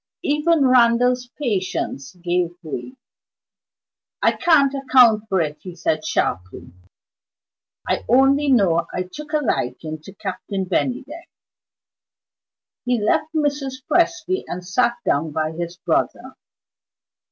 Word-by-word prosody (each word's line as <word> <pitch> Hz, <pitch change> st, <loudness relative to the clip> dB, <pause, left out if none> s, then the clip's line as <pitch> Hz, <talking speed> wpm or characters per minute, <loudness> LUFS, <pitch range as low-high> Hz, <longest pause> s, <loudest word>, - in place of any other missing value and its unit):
Even 300 Hz, 0 st, +2 dB
Randal's 245 Hz, 0 st, +3 dB
patience 185 Hz, -, -3 dB
gave 175 Hz, -1 st, -1 dB
way. 165 Hz, -, -6 dB, 1.2 s
"I -, -, +3 dB
can't 285 Hz, -5 st, +3 dB
account 245 Hz, -6 st, +4 dB
for 190 Hz, -2 st, +2 dB
it," 150 Hz, -2 st, -3 dB
he 180 Hz, -2 st, -9 dB
said 160 Hz, -2 st, -1 dB
sharply. 90 Hz, -1 st, -3 dB, 1.1 s
"I -, -, 0 dB
only 270 Hz, +4 st, +4 dB
know 175 Hz, -9 st, +3 dB
I 180 Hz, -, -2 dB
took 295 Hz, +12 st, -10 dB
a 310 Hz, -, +2 dB
liking 155 Hz, -, -2 dB
to 195 Hz, +5 st, -13 dB
Captain 195 Hz, -1 st, -4 dB
Bennydeck." 275 Hz, -, -3 dB, 1.5 s
He 245 Hz, -1 st, 0 dB
left 260 Hz, +9 st, +1 dB
Mrs. 280 Hz, -3 st, -1 dB
Presty 345 Hz, +2 st, +1 dB
and 180 Hz, 0 st, -6 dB
sat 240 Hz, +6 st, +1 dB
down 150 Hz, +3 st, +1 dB
by 155 Hz, 0 st, -1 dB
his 170 Hz, +1 st, -6 dB
brother. -, -, -1 dB
230 Hz, 115 wpm, -21 LUFS, 175-275 Hz, 1.5 s, account